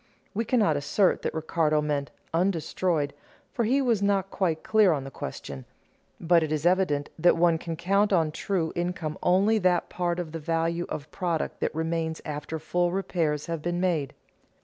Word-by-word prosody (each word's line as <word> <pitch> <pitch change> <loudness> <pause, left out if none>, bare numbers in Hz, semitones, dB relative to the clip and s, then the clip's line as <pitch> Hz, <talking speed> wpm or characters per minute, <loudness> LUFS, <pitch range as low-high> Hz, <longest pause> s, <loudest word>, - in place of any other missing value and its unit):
We 225 +3 -1
cannot 210 - +2
assert 145 +7 +2
that - - -2
Ricardo 160 -1 +1
meant 145 -2 -1 0.2
undestroyed, 170 -3 0 0.4
for 235 - 0
he 270 +5 +2
was 230 -5 +2
not 195 -1 +1
quite 165 -5 -1
clear 215 -5 +4
on 140 -3 -2
the 135 - -8
question. 70 - -7 0.6
But 170 0 +4
it 155 -1 -2
is 155 0 -1
evident 175 -6 +2
that 175 +2 +5
one 165 -1 +3
can 165 -1 -4
count 200 +5 +2
as 165 -5 +3
true 175 -4 -1
income 175 -3 -3
only 200 +5 +3
that 180 -2 +2
part 175 -1 -1
of 175 -3 -4
the 165 - -5
value 165 +2 -1
of 150 +1 -6
product 170 -3 -2
that - - -2
remains 160 0 -1
after 150 +1 -4
full 175 +2 0
repairs 165 -6 -1
have 165 -2 -4
been 175 +2 -2
made. 170 -7 0
170 Hz, 175 wpm, -27 LUFS, 155-185 Hz, 0.6 s, that